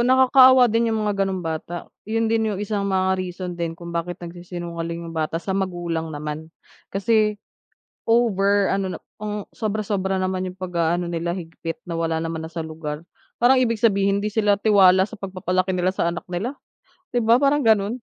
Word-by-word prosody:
nakakaawa 260 0 +7
din 230 +1 +2
yung 220 -1 0
mga 200 -2 +1
ganong 190 -2 -3
bata, 165 +2 -4 0.2
'yun 225 +1 +1
din 225 -1 +2
yung 190 - -4
isang 205 -1 -2
mga 190 0 +2
reason 180 0 -5
din 170 -1 -4
kung 170 0 -8
bakit 170 +1 -3
nagsisinungaling 170 -1 -6
yung 165 - -7
bata 155 +1 -1
sa 190 - -3
magulang 175 -4 -2
naman. 150 +2 -5 0.4
Kasi, 210 +1 +2 0.7
over 205 -4 +3
ano 195 -1 -1
na - - -6 0.2
ang 210 -1 -5
sobra-sobra 200 -3 -2
naman 185 0 -1
yung 185 - -23
pag-aano 175 -1 0
nila 170 0 -2
higpit 165 -2 -6
na 170 - -3
wala 165 -1 0
naman 165 -1 -4
na 160 - -8
sa 170 - -4
lugar, 155 -2 -5 0.4
parang 255 +2 +6
ibig 230 -4 +1
sabihin 200 -3 +3
hindi 210 - -1
sila 205 -1 +2
tiwala 190 -2 +5
sa 225 - -10
pagpapalaki 185 -1 -1
nila 180 0 +1
sa 185 - -1
anak 175 - -7
nila, 190 +9 -2 0.6
'di 245 - +3
ba 225 +1 +5
parang 285 +2 +3
gano'n? 215 -1 +3
190 Hz, 180 wpm, -23 LUFS, 170-215 Hz, 0.7 s, nakakaawa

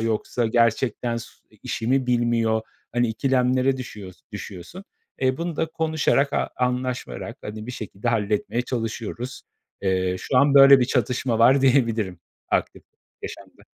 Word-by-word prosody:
yoksa 115 +1 -1
gerçekten 115 +1 +1
s 115 - -7 0.2
i - - -22
işi 115 - -4
mi 130 0 +2
bilmiyor? 120 -2 +1 0.3
Hani, 120 -1 +1
ikilemlere 130 +2 +1
düşüyors 105 -7 -9
düşüyorsun. 100 - -8 0.4
E, 130 0 +2
bunu 170 -2 -4
da - - 0
konuşarak 155 -3 +1
a - - -1
anlaşarak 125 0 -2
hadi 105 +1 -7
bir 125 - -5
şekilde 110 0 -5
halletmeye 110 +2 0
çalışıyoruz. 115 +1 -4 0.4
Eee, 95 -1 0
şu 130 - -2
an 140 +1 +5
böyle 135 -1 +9
bir - - +4
çatışma 125 -1 0
var 130 +4 +6
diyebilirim 115 -9 +2 0.3
aktif - - -1 0.4
yaşamda. - - -10
120 Hz, 140 wpm, -23 LUFS, 110-130 Hz, 0.4 s, böyle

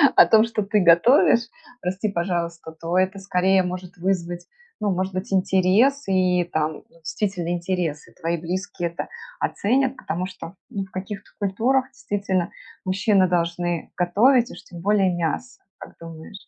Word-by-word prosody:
о - - +9
том, 220 0 +6
что 230 -2 -2
ты 205 +1 +1
готовишь, 230 - +5 0.3
прости, 190 +4 -2
пожалуйста, 170 -3 -3
то 165 +2 -3
это 190 +1 +1
скорее 190 0 +2
может 180 +1 -6
вызвать, 175 -1 -2 0.3
ну, 210 - 0
может 185 +1 -2
быть 185 +1 -4
интерес 190 +9 +3
и 185 -2 +2
там, 155 0 -1
действительно, 175 +1 -3
интерес. 175 -3 -2
И - - -19
твои 170 +1 -2
близкие 175 +1 -3
это 170 - -5 0.3
оценят, 260 +5 +1
потому 175 -4 -3
что, 185 -1 -9
ну, 195 -2 -4
в 190 - -22
каких-то 195 +2 -6
культурах 230 +7 +1
действительно 195 -7 -2 0.3
мужчины 190 0 +3
должны 170 -1 -1
готовить 230 +8 +4
и - - -9
уж - - -12
тем 170 - -11
более 195 -2 +3
мясо, 175 +10 -3 0.2
как - - -12
думаешь? 165 +4 -11
185 Hz, 155 wpm, -23 LUFS, 175-200 Hz, 0.3 s, о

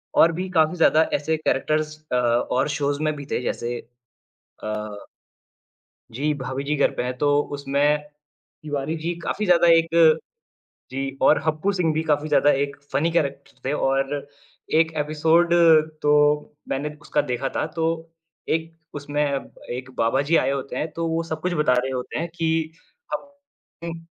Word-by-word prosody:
और 165 - +6
भी 185 +1 -3
काफ़ी 160 -1 +2
ज़्यादा 160 -1 +5
ऐसे 155 +2 0
कैरेक्टर्स 155 +1 0
अ, - - +1
और 125 +3 +1
शोज़ 145 0 -1
में 155 - +1
भी 145 -1 -8
थे - - 0
जैसे 120 0 -2 0.9
अ 105 -1 -5 1.1
जी, 145 +6 -1
भाभी 135 -1 -4
जी 150 +2 -1
घर 140 - +2
पे - - -1
हैं, 125 0 -4
तो 145 +1 +3 0.2
उसमें 140 +1 +2 0.7
तिवारी 150 +1 -3
जी 165 +2 -3
काफ़ी 210 - -2
ज़्यादा 175 -1 +5
एक 165 0 +5 1.0
जी 135 +1 -4
और 155 - +6
हप्पु 155 +6 +1
सिंह 175 -5 +1
भी 160 - 0
काफ़ी 150 -1 +1
ज़्यादा 145 -1 +4
एक 140 0 -4 0.2
फ़नी 150 +5 +1
कैरेक्टर 140 -5 -2
थे 135 - 0
और 135 -1 0 0.7
1 160 0 +2
एपिसोड 160 +3 +2 0.5
तो 150 - +3 0.6
मैंने 150 +2 -3
उसका - - 0
देखा 135 +2 -1
था - - 0
तो, 165 +1 -2 0.4
एक 165 +1 -1 0.2
उसमें 145 0 -2 0.5
एक 130 +1 -7
बाबा 115 +4 +2
जी 155 +4 +2
आए 135 - +2
होते 140 0 -4
हैं, 155 - -2
तो 165 0 -3
वो 165 +1 0
सब 160 -2 -5
कुछ 180 +2 -1
बता 150 -5 +2
रहे 130 +2 -1
होते 125 -1 -4
हैं 170 +2 -2
कि 160 -1 0 0.4
हप 285 0 -6 0.4
उ 165 0 -6
150 Hz, 165 wpm, -23 LUFS, 135-160 Hz, 1.1 s, और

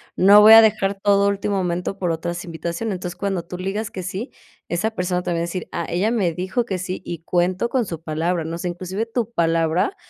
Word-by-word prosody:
no 200 +3 +7
voy 215 +1 +9
a 225 0 +10
dejar 200 -2 +1
todo 200 -1 +4
a - - +4
último 200 0 -1
momento 180 +1 -2
por 180 - -1
otras 170 +2 -3
invitaciones, 170 +5 -4
entonces, 180 -1 -6
cuando 195 -4 -2
tú 180 - -8
le 185 - -5
digas 210 +2 -3
que 185 - -6
sí, 185 +8 -5 0.4
esa 175 +6 0
persona 180 -4 -2
te 180 - -5
va 170 - 0
a - - -1
decir: 170 +1 -4
"Ah, 170 - -3
ella 185 +5 0
me 200 -8 0
dijo 190 +8 -2
que 190 -5 -3
sí 185 0 -4
y 170 - -5
cuento 180 +6 0
con 250 -2 0
su 165 -4 -6
palabra", 165 +2 -1
no 165 +1 -5
sé, 175 +1 -3
inclusive 185 +5 -4
tu 230 0 -3
palabra 165 - +1
185 Hz, 240 wpm, -21 LUFS, 170-205 Hz, 0.4 s, a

